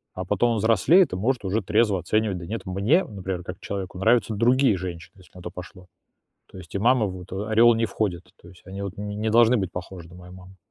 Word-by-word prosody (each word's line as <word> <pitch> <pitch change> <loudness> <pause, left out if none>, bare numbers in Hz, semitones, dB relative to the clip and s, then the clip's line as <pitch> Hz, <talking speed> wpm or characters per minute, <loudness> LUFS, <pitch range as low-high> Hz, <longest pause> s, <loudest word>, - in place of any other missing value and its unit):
а 95 - -5
потом, 110 +5 +1
взрослеет, 115 - +4
и - - -1
может 115 +3 -1
уже 100 +4 0
трезво 105 0 +1
оценивать. 100 +1 -1
Да 85 - -9
нет, 110 +4 -5
мне, 100 - +2
например, 95 -4 -6
как 90 +2 -8
человеку 95 -2 -6
нравятся 110 +1 +2
другие 120 +1 +3
женщины, 90 -1 -7
если 90 - -19
на 90 - -12
то 90 - -6
пошло. 90 +1 -11 0.7
То - - -10
есть 85 -3 -13
и 100 - 0
мама 120 0 +3
вот 90 -1 -8
в 100 +3 -4
ореол 115 +2 +5
не 115 0 0
входит, 90 -7 -3 0.2
то 85 - -16
есть 90 -1 -17
они 95 +1 -7
вот 100 0 -6
ни 105 0 -5
не 110 +1 -2
должны 120 +2 +5
быть 95 -4 -3
похожи 90 -1 -8
на - - -14
мою 90 0 -13
маму, 95 +1 -14
100 Hz, 235 wpm, -24 LUFS, 90-110 Hz, 0.7 s, ореол